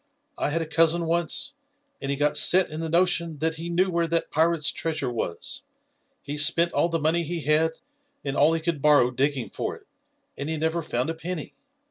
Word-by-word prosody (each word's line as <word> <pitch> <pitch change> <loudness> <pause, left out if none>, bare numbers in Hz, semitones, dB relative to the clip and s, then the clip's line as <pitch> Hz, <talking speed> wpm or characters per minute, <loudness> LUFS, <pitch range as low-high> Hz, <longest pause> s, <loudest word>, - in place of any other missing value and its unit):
I - - -2
had 165 +2 0
a - - -6
cousin 165 +2 +2
once, 170 - 0 0.5
and 135 - -4
he 140 - -1
got 145 +1 +1
set 185 -2 +5
in 155 - -5
the 165 0 -4
notion 170 -2 +1
that 160 +1 -1
he 165 +2 -6
knew 185 +2 +1
where 170 -1 0
that 165 +1 0
pirate's 160 -1 +2
treasure 155 -6 -3
was. 110 -7 -4 0.6
He 145 +2 -5
spent 170 +3 +5
all 170 - +1
the 165 - 0
money 160 +2 +1
he 170 +1 -4
had 155 +2 +2 0.5
and 140 0 -2
all 155 +3 +4
he 165 - -1
could 160 -3 -2
borrow 145 -4 +4
digging 135 0 -1
for - - -4
it, - - -18 0.5
and 140 +2 -5
he 160 - -2
never 160 +2 -1
found 125 0 -2
a - - -4
penny. 165 -1 -5
160 Hz, 205 wpm, -25 LUFS, 150-170 Hz, 0.6 s, set